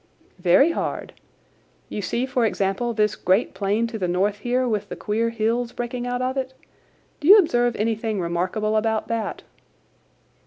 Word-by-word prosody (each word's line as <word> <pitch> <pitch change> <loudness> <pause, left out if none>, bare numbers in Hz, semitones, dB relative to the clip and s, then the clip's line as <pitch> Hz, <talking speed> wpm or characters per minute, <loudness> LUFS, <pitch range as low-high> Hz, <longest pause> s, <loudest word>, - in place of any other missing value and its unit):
"Very 185 - +5
hard. - - -4 0.7
You 210 - -5
see, 235 +5 -1
for 255 -2 0
example, 200 +2 0
this 210 -2 +1
great 190 +5 +1
plain 205 +3 0
to 230 -1 -5
the 180 - 0
north 195 +4 0
here 250 +3 0
with 215 -4 -2
the - - -5
queer 225 +2 -1
hills 230 +2 -1
breaking 245 0 -4
out 245 +1 -2
of 260 +1 -2
it. 260 0 -3 0.6
Do 290 - -3
you 405 +4 +10
observe 245 - +2
anything 220 -1 -1
remarkable 185 +5 -1
about 220 0 0
that?" 225 -2 -3
225 Hz, 160 wpm, -23 LUFS, 205-245 Hz, 0.7 s, you